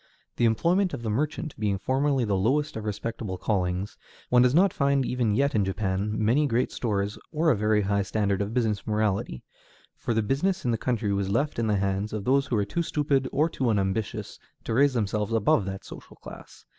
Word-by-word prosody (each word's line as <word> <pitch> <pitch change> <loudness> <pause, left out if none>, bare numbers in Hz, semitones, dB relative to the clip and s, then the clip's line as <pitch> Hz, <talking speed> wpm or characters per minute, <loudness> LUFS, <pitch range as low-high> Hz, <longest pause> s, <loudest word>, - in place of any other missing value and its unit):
The 120 - +3
employment 170 - +2
of 120 - -9
the 110 - -1
merchant 150 +5 -2
being 105 -2 0
formerly 135 +3 +1
the 100 -2 0
lowest 145 +10 +1
of 110 -1 -5
respectable 105 -2 -4
callings, 90 0 -2 0.3
one 125 0 +5
does 125 +2 +4
not 190 +2 +4
find 140 -2 +1
even 120 -5 0
yet 140 +3 +2
in 105 - +2
Japan 95 +1 -1
many 120 +8 +2
great 125 0 0
stores 105 -3 -2
or 160 +1 +2
a - - +3
very 105 0 +2
high 100 +1 +1
standard 100 -1 0
of 100 +1 -2
business 110 -4 -1
morality, 105 - -1 0.5
for 120 - -3
the 110 - +2
business 145 - 0
of 120 - +2
the 115 - 0
country 110 -5 -1
was 100 -1 -1
left 120 +6 0
in 115 - 0
the 105 - +2
hands 100 +2 -1
of 105 -2 -4
those 135 +1 +2
who 125 - -1
were 105 -2 +1
too 170 +12 -2
stupid 140 -5 0
or 150 +3 +2
too 130 -6 -1
unambitious 100 0 -2 0.2
to - - -3
raise 135 +2 +3
themselves 105 0 -1
above 105 -2 +2
that 95 0 -6
social - - -11
class. - - -13
110 Hz, 205 wpm, -26 LUFS, 100-135 Hz, 0.5 s, one